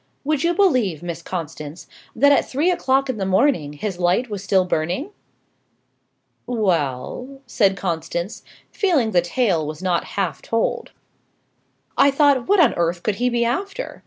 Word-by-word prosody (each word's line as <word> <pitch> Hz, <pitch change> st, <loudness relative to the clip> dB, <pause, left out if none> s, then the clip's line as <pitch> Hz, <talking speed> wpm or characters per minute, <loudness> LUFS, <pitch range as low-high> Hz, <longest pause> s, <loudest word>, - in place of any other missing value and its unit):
Would 295 Hz, -1 st, 0 dB
you 345 Hz, +1 st, +1 dB
believe, 250 Hz, -, +2 dB
Miss 170 Hz, -1 st, -5 dB
Constance, 160 Hz, -2 st, -6 dB, 0.3 s
that 285 Hz, +5 st, +5 dB
at 285 Hz, -, +2 dB
three 305 Hz, +7 st, +1 dB
o'clock 275 Hz, -5 st, +1 dB
in 260 Hz, -4 st, -3 dB
the -, -, -1 dB
morning 190 Hz, -, +2 dB
his 180 Hz, +4 st, -5 dB
light 185 Hz, +7 st, +1 dB
was 200 Hz, -2 st, -4 dB
still 190 Hz, -1 st, +2 dB
burning?" 180 Hz, -, -2 dB, 1.4 s
"Well," 210 Hz, -, -2 dB
said 200 Hz, -5 st, +2 dB
Constance, 170 Hz, +2 st, -3 dB, 0.3 s
feeling 305 Hz, -, +1 dB
the 180 Hz, -3 st, +4 dB
tale 175 Hz, -2 st, 0 dB
was 155 Hz, +3 st, -6 dB
not 180 Hz, -2 st, +1 dB
half 195 Hz, -3 st, -1 dB
told. 230 Hz, 0 st, -2 dB, 1.1 s
"I 280 Hz, -, +7 dB
thought, 280 Hz, -3 st, +3 dB
what 405 Hz, 0 st, +4 dB
on 300 Hz, -8 st, +5 dB
earth 170 Hz, 0 st, -1 dB
could 210 Hz, -2 st, -1 dB
he 250 Hz, +1 st, +1 dB
be 235 Hz, -1 st, +1 dB
after? 395 Hz, -, -3 dB
210 Hz, 155 wpm, -21 LUFS, 175-275 Hz, 1.4 s, I